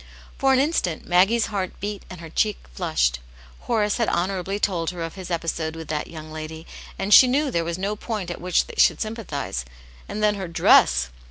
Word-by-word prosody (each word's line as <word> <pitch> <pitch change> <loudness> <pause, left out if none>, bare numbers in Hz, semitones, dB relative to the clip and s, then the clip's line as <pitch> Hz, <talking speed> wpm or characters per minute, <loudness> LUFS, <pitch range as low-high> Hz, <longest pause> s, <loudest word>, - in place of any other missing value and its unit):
For 270 0 +3
an 265 - +5
instant 265 - 0
Maggie's 195 +6 +3
heart 190 -2 -3
beat 205 0 -5
and 180 -2 -9
her 165 - -9
cheek 210 +3 +1 0.2
flushed. - - 0 0.4
Horace 210 - 0
had 230 - +1
honourably 190 +2 -1
told 175 -6 0
her 175 -2 -5
of 165 - -5
his 185 -2 -8
episode 165 -2 -2
with 160 -2 -8
that 150 -1 -2
young 155 -1 -9
lady, 155 +1 -7 0.3
and 195 +2 +1
she 255 - +10
knew 275 +2 +1
there 170 - 0
was 170 +1 -3
no 200 +3 -2
point 210 -5 -4
at 175 - -7
which 180 0 +2
they - - -11
should 165 - +5
sympathize; 205 - -4 0.5
and 210 +1 -3
then 210 0 +4
her 195 -3 -5
dress 65 - +4
180 Hz, 200 wpm, -23 LUFS, 165-210 Hz, 0.5 s, she